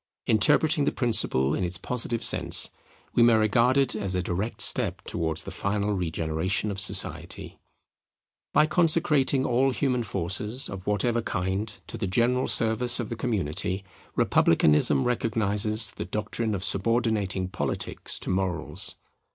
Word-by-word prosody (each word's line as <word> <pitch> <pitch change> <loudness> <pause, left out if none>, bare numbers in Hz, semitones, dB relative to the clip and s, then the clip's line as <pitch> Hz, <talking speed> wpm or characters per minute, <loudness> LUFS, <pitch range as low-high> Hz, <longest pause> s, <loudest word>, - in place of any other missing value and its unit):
Interpreting 150 - +3
the - - +1
principle 75 - +3
in 95 - -2
its 90 +1 -3
positive 120 -2 -3
sense, - - +2 0.4
we - - +2
may 120 -1 +5
regard 115 +4 +2
it 135 -4 +1
as 100 -3 -2
a 90 - -1
direct 95 +6 -4
step - - +3
towards 80 -1 -2
the - - -8
final 105 +1 -2
regeneration 85 +3 -2
of 100 - -5
society. 100 - 0 0.9
By 150 - +4
consecrating 155 -5 +1
all 130 +2 +2
human 125 0 -1
forces 105 +4 -2
of 95 -2 -9
whatever 115 +3 0
kind 95 +2 -3
to 115 - -7
the 105 - -2
general 120 +6 +1
service 120 +2 +2
of 120 - -4
the 115 - -4
community, 95 -4 -3 0.3
republicanism 75 -2 +3
recognizes 110 -2 +1
the - - -7
doctrine 110 +1 -3
of 95 - -5
subordinating 105 -3 0
Politics - - -3
to - - -4
Morals. 95 -2 -1
110 Hz, 140 wpm, -26 LUFS, 95-120 Hz, 0.9 s, may